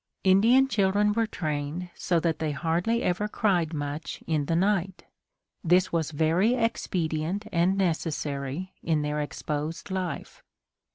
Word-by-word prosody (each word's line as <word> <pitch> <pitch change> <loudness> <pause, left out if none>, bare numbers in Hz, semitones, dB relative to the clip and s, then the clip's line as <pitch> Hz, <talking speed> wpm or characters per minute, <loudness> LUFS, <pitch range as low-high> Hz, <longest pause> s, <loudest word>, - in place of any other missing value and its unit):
Indian 225 +8 +5
children 205 -2 +2
were 225 +1 +1
trained 155 +1 -3
so 175 -2 0
that 165 -2 0
they 155 -2 -1
hardly 175 +10 0
ever 180 +4 0
cried 180 -7 +1
much 145 0 -5
in 155 -3 0
the 165 - +1
night. 190 0 0 0.6
This 180 +2 +3
was 165 -3 0
very 165 +9 +2
expedient 185 -5 -1
and 180 +3 +2
necessary 155 -2 -2
in 155 -2 0
their 150 0 -1
exposed 150 +4 -4
life. 185 -2 -4
170 Hz, 130 wpm, -27 LUFS, 155-195 Hz, 0.6 s, Indian